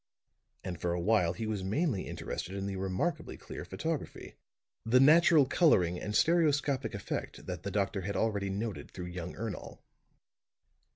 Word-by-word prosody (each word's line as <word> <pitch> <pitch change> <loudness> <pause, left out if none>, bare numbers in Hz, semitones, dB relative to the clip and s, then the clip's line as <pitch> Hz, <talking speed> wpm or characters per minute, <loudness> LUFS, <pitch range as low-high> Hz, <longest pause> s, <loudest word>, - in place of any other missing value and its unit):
And 90 -3 -5
for 85 -1 0
a 90 - -1
while 90 -2 +2
he 110 +5 -4
was 105 -3 -2
mainly 110 - 0
interested 95 - -5
in 100 0 -3
the 100 -1 -3
remarkably 95 0 -2
clear - - -8
photography, - - -4 0.5
the 115 +3 +4
natural 155 +1 +6
coloring 90 - +3
and 105 0 -4
stereoscopic 145 -6 +2
effect 100 - -5
that 90 -3 -5
the 100 - -4
doctor 100 0 -1
had 100 +2 -4
already 100 -3 0
noted 105 +1 -4
through 90 - -7
young 90 0 -6
Ernol. 110 -1 -6
100 Hz, 155 wpm, -31 LUFS, 95-130 Hz, 0.5 s, natural